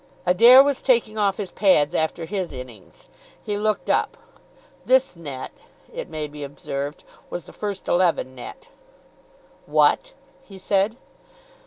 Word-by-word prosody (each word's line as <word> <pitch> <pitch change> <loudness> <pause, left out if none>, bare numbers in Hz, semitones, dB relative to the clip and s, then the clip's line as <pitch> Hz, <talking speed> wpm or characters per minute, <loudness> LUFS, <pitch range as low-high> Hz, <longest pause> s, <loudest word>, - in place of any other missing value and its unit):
Adair 235 +9 +8
was 280 -1 -1
taking 230 -4 +2
off 200 -2 +1
his 200 -3 -5
pads 175 -6 +3
after 165 0 -1
his 185 -1 -4
innings. 125 -7 -12 0.4
He 205 - -3
looked 210 0 -1
up. - - 0 0.7
"This 260 -5 +2
net," 140 -6 -7 0.4
it - - -6
may 155 -2 -4
be 145 0 -9
observed, 140 +1 -6 0.3
was 175 - -6
the - - -14
first 205 -2 -5
eleven 175 -7 +1
net. 460 - -11 1.0
"What?" - - +2 0.3
he 195 - -13
said. 195 +4 0
185 Hz, 135 wpm, -23 LUFS, 150-215 Hz, 1.0 s, Adair